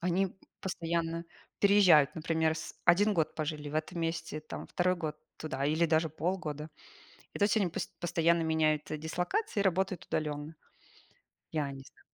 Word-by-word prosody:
Они 180 Hz, +2 st, +1 dB, 0.3 s
постоянно 170 Hz, -2 st, -2 dB, 0.3 s
переезжают. 185 Hz, -8 st, +6 dB
Например, 160 Hz, 0 st, +1 dB
с 160 Hz, -, -7 dB
1 205 Hz, +4 st, +5 dB
год 160 Hz, -4 st, +1 dB
пожили 150 Hz, -1 st, -3 dB
в 145 Hz, -, -7 dB
этом 160 Hz, +3 st, -2 dB
месте, 165 Hz, -1 st, -2 dB
там 155 Hz, -, -7 dB
2 180 Hz, +1 st, +1 dB
год 155 Hz, -3 st, -4 dB, 0.2 s
туда 140 Hz, -3 st, -3 dB
или 160 Hz, +3 st, +3 dB
даже 160 Hz, 0 st, +2 dB
полгода. 155 Hz, -2 st, -3 dB, 0.7 s
И -, -, -6 dB
то -, -, +3 dB
есть 210 Hz, +2 st, +2 dB
они 200 Hz, -4 st, +2 dB
пос 170 Hz, -, -3 dB
постоянно 170 Hz, -1 st, +2 dB
меняют, 155 Hz, -2 st, +1 dB
э, 155 Hz, -, -2 dB
дислокации 180 Hz, -, -1 dB
и -, -, +3 dB
работают 190 Hz, -1 st, 0 dB
удаленно. 150 Hz, +1 st, -3 dB, 1.0 s
Я 150 Hz, -3 st, -1 dB
не 135 Hz, 0 st, -9 dB
зна -, -, -19 dB
165 Hz, 165 wpm, -31 LUFS, 155-180 Hz, 1.0 s, переезжают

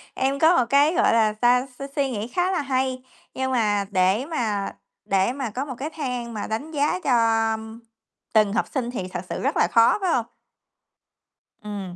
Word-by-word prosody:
Em 275 Hz, +1 st, 0 dB
có 330 Hz, +2 st, +5 dB
một 245 Hz, -, +3 dB
cái, 285 Hz, +5 st, +4 dB
gọi -, -, +3 dB
là 220 Hz, -2 st, +3 dB
sao, 250 Hz, +1 st, +4 dB
suy 275 Hz, -, -4 dB
suy 275 Hz, -2 st, +1 dB
nghĩ 220 Hz, -2 st, -4 dB
khá 355 Hz, +9 st, 0 dB
là 355 Hz, -, 0 dB
hay, 260 Hz, -1 st, -1 dB, 0.3 s
nhưng 260 Hz, 0 st, -2 dB
mà 210 Hz, -5 st, +1 dB
để 190 Hz, +5 st, +2 dB
mà 220 Hz, -11 st, -2 dB, 0.3 s
để 195 Hz, +4 st, +2 dB
mà 265 Hz, -4 st, -4 dB
có 255 Hz, +6 st, -4 dB
một 260 Hz, -, -6 dB
cái 295 Hz, +4 st, -4 dB
thang 250 Hz, -6 st, -4 dB
mà 210 Hz, -, -4 dB
đánh 255 Hz, +9 st, -4 dB
giá 295 Hz, +4 st, 0 dB
cho 230 Hz, -3 st, +3 dB, 0.9 s
từng 215 Hz, -2 st, +4 dB
học -, -, +1 dB
sinh 245 Hz, -3 st, -3 dB
thì 190 Hz, -7 st, -4 dB
thật 180 Hz, -1 st, -5 dB
sự -, -, -4 dB
rất -, -, 0 dB
là -, -, +4 dB
khó, 230 Hz, 0 st, +5 dB
phải 365 Hz, -3 st, +1 dB
hông? 235 Hz, -, +1 dB, 1.4 s
Ừm, 200 Hz, -4 st, -6 dB
245 Hz, 195 wpm, -23 LUFS, 215-275 Hz, 1.4 s, có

